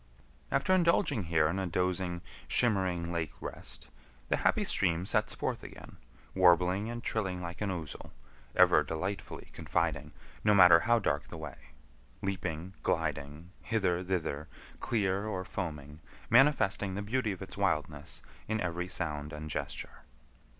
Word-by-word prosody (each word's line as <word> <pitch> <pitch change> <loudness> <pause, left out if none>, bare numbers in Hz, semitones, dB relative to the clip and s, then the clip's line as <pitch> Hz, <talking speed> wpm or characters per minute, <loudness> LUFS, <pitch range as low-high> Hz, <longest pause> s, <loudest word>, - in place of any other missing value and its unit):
After 185 - +2
indulging 170 - +3
here 80 -2 +3
in 90 +5 -1
a 95 - -1
dozing, 90 0 -1 0.2
shimmering 95 -7 +1
lake 85 -3 -2
rest, - - -8 0.4
the - - +2
happy - - +2
stream 85 +1 +1
sets 105 - +1
forth - - -2
again, - - -11 0.4
warbling 90 +3 +4
and 120 0 -5
trilling 95 -5 -1
like 85 +2 -6
an 105 - 0
ouzel, 85 -5 -5 0.5
ever - - +6
delightfully 90 +6 -4
confiding, - - -1 0.3
no 105 -1 +5
matter 90 -3 +9
how 120 +5 +3
dark 75 -9 0
the - - -8
way; - - -9 0.5
leaping, 90 -2 -3
gliding, 75 +5 -2
hither, 95 -5 0
thither, 80 -5 -2 0.3
clear 100 -2 0
or 95 -3 -3
foaming: 75 -6 -5 0.3
manifesting 110 -7 +4
the 100 - -3
beauty 110 +1 0
of 95 0 -6
its 95 - -9
wildness 75 -7 -1 0.2
in 110 0 0
every 90 -1 -2
sound 75 -4 -3
and 75 0 -6
gesture. - - -5
90 Hz, 140 wpm, -31 LUFS, 85-100 Hz, 0.5 s, matter